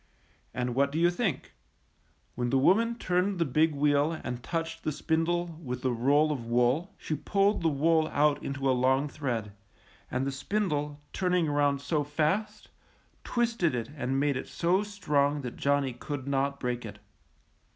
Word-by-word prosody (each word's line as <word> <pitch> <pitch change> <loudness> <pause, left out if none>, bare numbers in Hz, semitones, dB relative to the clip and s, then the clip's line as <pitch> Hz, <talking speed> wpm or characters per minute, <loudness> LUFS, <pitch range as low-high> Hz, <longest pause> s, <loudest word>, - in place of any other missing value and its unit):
And 125 -1 -2
what 140 +2 +2
do 155 - -3
you 170 +1 +4
think? 175 - -2 0.8
When 120 0 -2
the 135 - +2
wo 140 +7 +6
man 230 +3 0
turned 185 -2 0
the 170 - +1
big 155 +3 +2
wheel 145 +2 +2
and 125 -1 -4
touched 165 +3 -4
the 155 - 0
spindle 165 +2 -1
with 125 -2 -5
the 130 - +1
roll 140 +6 +3
of 135 -5 -3
wool, 125 +10 +1
she - - -4
pulled 195 +8 +1
the 165 - +2
wool 160 +2 +2
out 150 -1 +2
into 140 0 -3
a 130 - +4
long 130 +3 +2
thread, 120 -8 -3 0.6
and 130 +2 -1
the 140 - -1
spindle, 150 -2 -2
turning 180 -3 +1
around 145 -1 +1
so 145 +1 0
fast, 175 +9 -1 0.5
twisted 230 - 0
it 115 +2 -4
and 135 -1 -1
made 140 -2 +1
it - - -5
so 180 +3 +1
strong 150 -9 0
that 125 -3 -6
Johnny 140 -2 +1
could 140 +1 -6
not 140 0 0
break 125 -1 -2
it. - - -8
145 Hz, 170 wpm, -29 LUFS, 135-170 Hz, 0.8 s, wo